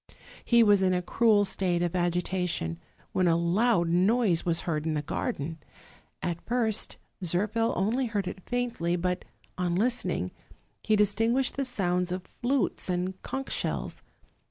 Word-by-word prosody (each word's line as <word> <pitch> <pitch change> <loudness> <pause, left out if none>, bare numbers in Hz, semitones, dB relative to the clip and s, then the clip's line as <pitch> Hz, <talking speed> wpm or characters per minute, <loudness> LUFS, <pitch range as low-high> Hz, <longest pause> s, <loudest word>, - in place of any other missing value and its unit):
He 235 -1 +5
was 205 -2 +5
in 185 -1 +3
a 180 - 0
cruel 215 0 +3
state 185 -2 +1
of 175 0 -1
agitation, 175 - -1 0.3
when 185 -1 +2
a 165 - +4
loud 175 +2 +2
noise 185 +1 +3
was 170 -1 0
heard 155 -3 -2
in 155 - 0
the 150 - -1
garden. 155 +2 -3 0.6
At 170 -1 -2
first 230 -3 0 0.3
Zirphil 210 +7 +1
only 230 +8 +1
heard 205 -4 -2
it 185 - -6
faintly; 240 -9 0
but, 180 +1 -2 0.3
on 175 -1 0
listening, 240 +6 0 0.5
he 215 - +2
dis 205 -1 +3
tinguished 235 +4 +1
the 275 - -1
sounds 180 -7 0
of 185 0 -4
flutes 255 -4 0
and 180 +1 -2
conch 270 0 -5
shells. - - -3
185 Hz, 155 wpm, -28 LUFS, 175-225 Hz, 0.6 s, He